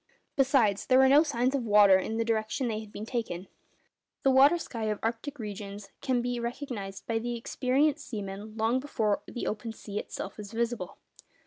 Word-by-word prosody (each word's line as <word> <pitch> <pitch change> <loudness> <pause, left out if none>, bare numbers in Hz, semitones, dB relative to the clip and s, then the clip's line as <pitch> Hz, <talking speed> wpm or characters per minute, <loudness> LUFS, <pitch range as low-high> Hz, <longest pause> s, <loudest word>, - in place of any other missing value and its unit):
Besides, 255 -8 +3
there 255 - +5
were 265 0 +7
no 280 +3 +7
signs 260 -4 0
of 275 - +1
water 205 -3 +6
in 220 +4 -3
the 230 - 0
direction 225 +4 0
they 215 -2 -2
had 215 -1 -10
been 210 - -6
taking. 220 -7 -3 0.8
The 270 - +5
water 275 +6 +6
sky 230 -9 -5
of 210 -1 0
arctic 235 +6 -3
regions 205 -2 -7
can 250 -2 +1
be 245 0 -1
recognised 235 -5 -5
by 225 -1 0
the 240 +1 -3
experienced 275 +5 0
seamen 210 0 -6
long 225 +3 +2
before 225 -7 0
the 240 - -5
open 220 +2 -3
sea 205 -1 -5
itself 195 - -6
is 210 +1 -8
visible. 230 -5 -2
230 Hz, 185 wpm, -29 LUFS, 210-260 Hz, 0.8 s, were